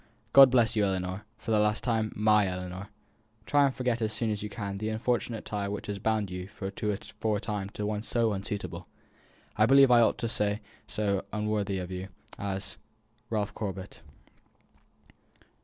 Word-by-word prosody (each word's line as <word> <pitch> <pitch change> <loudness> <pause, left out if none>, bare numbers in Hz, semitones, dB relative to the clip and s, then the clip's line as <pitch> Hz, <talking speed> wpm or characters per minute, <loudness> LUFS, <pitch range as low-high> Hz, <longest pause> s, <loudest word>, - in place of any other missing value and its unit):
God 135 -1 +10
bless 120 -3 +3
you, 105 - +3
my 100 - +3
Ellinor, 95 +2 -4
for - - -5
the 110 - +4
last 105 +1 +2
time 110 -3 0
my 105 -1 +4
Ellinor. 90 +1 -5 0.6
Try 145 +1 +4
to - - -3
forget 125 -2 -1
as 110 -1 0
soon 110 +1 -1
as 105 - -3
you 105 - -4
can 100 -3 -5
the 110 +1 -2
unfortunate 115 0 -1
tie 100 -1 -2
which 100 +1 -4
has 100 -1 -4
bound 110 -2 0
you 90 0 -5
for 100 -2 -6
a 105 0 -2
time 100 -1 -3
to 105 0 -4
one 105 0 -1
so 115 -1 +1
unsuitable 100 +1 -5 0.7
I 110 +1 +5
believe 135 0 +7
I 120 -1 +7
ought 115 - +3
to 115 - -2
say 105 -2 0 0.3
so 100 -2 0
unworthy 105 -2 -1
of 90 0 -5
you 95 +1 -4 0.3
as 100 0 -4 0.5
RALPH 105 -2 -1
CORBET." 95 -2 -6
105 Hz, 175 wpm, -29 LUFS, 100-110 Hz, 0.7 s, God